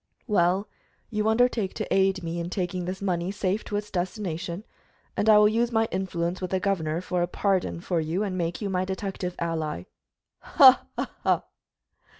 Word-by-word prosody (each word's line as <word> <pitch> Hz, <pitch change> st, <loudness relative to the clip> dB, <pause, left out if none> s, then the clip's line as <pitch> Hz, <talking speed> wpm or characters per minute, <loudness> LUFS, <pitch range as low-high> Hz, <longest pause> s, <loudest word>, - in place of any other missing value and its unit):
"Well, 195 Hz, -1 st, +2 dB, 0.4 s
you 215 Hz, -1 st, 0 dB
undertake 220 Hz, -3 st, +2 dB
to -, -, -2 dB
aid 190 Hz, -1 st, +2 dB
me 170 Hz, +1 st, -3 dB
in 170 Hz, 0 st, -3 dB
taking 180 Hz, -1 st, -2 dB
this 190 Hz, +2 st, -5 dB
money 175 Hz, -2 st, 0 dB
safe 200 Hz, 0 st, -1 dB
to 205 Hz, -, -4 dB
its 210 Hz, 0 st, -5 dB
destination, 180 Hz, -1 st, -3 dB, 0.5 s
and 220 Hz, -, +1 dB
I 215 Hz, -, +8 dB
will 210 Hz, 0 st, +7 dB
use 230 Hz, +3 st, +1 dB
my 225 Hz, -1 st, +2 dB
influence 180 Hz, -1 st, -2 dB
with 185 Hz, -, -3 dB
the 190 Hz, -, 0 dB
governor 170 Hz, -4 st, -1 dB
for 180 Hz, -1 st, -1 dB
a 175 Hz, -, +1 dB
pardon 185 Hz, -2 st, 0 dB
for 175 Hz, -1 st, -1 dB
you 165 Hz, +6 st, -1 dB
and 195 Hz, -3 st, -2 dB
make 170 Hz, +1 st, -2 dB
you 200 Hz, -, -1 dB
my 185 Hz, 0 st, +1 dB
detective 190 Hz, -1 st, -4 dB
ally." 160 Hz, -, -2 dB, 0.6 s
"Ha! -, -, +6 dB
ha! -, -, -2 dB
ha!" -, -, +2 dB
185 Hz, 180 wpm, -26 LUFS, 175-205 Hz, 0.6 s, I